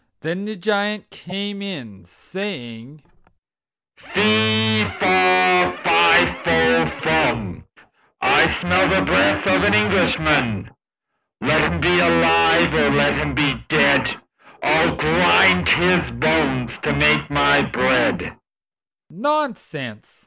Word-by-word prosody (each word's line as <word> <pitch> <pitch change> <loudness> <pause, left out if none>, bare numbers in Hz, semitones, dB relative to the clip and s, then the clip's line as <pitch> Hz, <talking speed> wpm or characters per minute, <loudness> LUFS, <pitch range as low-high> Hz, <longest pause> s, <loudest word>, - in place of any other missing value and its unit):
Then 170 +5 -6
the 215 +1 -7
Giant 205 +1 -4
came 200 +2 -8
in, 120 - -10
saying: 135 - -10 0.9
"Fe, 110 0 +1
fa, 185 -1 +2
fi 85 0 +3
fo 80 0 +2 0.2
furn, 120 - -2 0.5
I - - +3
smell - - +1
the - - +1
breath 100 0 +1
of 95 0 +1
an 105 - +2
Englishman. 115 +1 0 0.7
Let 80 - 0
him 85 -1 -4
he 90 - +2
alive 85 -1 +2
or 70 - +1
let 70 0 +1
him 145 -2 -4
be 135 -6 -1
dead, - - +1 0.4
I'll - - +1
grind 90 -2 +2
his 180 +1 +1
bones 130 -1 -1
to 75 - -2
make 75 +1 +1
my 145 0 +2
bread." 125 -1 -1 0.8
"Nonsense!" 205 - -6
125 Hz, 105 wpm, -18 LUFS, -, 0.9 s, fi